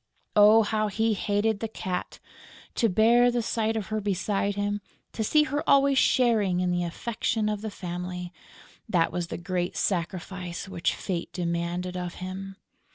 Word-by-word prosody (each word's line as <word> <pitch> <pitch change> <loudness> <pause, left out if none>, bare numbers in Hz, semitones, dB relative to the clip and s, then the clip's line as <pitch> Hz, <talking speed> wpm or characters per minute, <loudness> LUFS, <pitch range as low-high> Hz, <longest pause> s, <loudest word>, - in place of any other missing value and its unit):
Oh, 215 +2 +7
how 215 0 0
he 220 +2 +1
hated 205 +1 0
the 225 - -2
Cat! 185 -4 -4 0.6
To 230 - +2
bear 235 +5 +5
the 240 -1 0
sight 225 0 0
of 215 -2 -3
her 215 0 -1
beside 200 0 -1
him, 205 0 -1 0.3
to 220 - -2
see 300 +8 +4
her 290 0 -2
always 275 -1 +5
sharing 215 -8 +3
in 180 0 +1
the 175 0 0
affection 220 +4 -2
of 210 -1 -2
the 220 - -4
family: 180 -1 -6 0.6
that 170 -5 +2
was 175 -1 -2
the - - -5
great 180 0 -2
sacrifice 180 0 -3
which 180 -3 -1
fate 175 -4 -4
demanded 175 +1 -2
of 180 -1 -4
him. 190 +1 -6
200 Hz, 160 wpm, -27 LUFS, 180-220 Hz, 0.6 s, Oh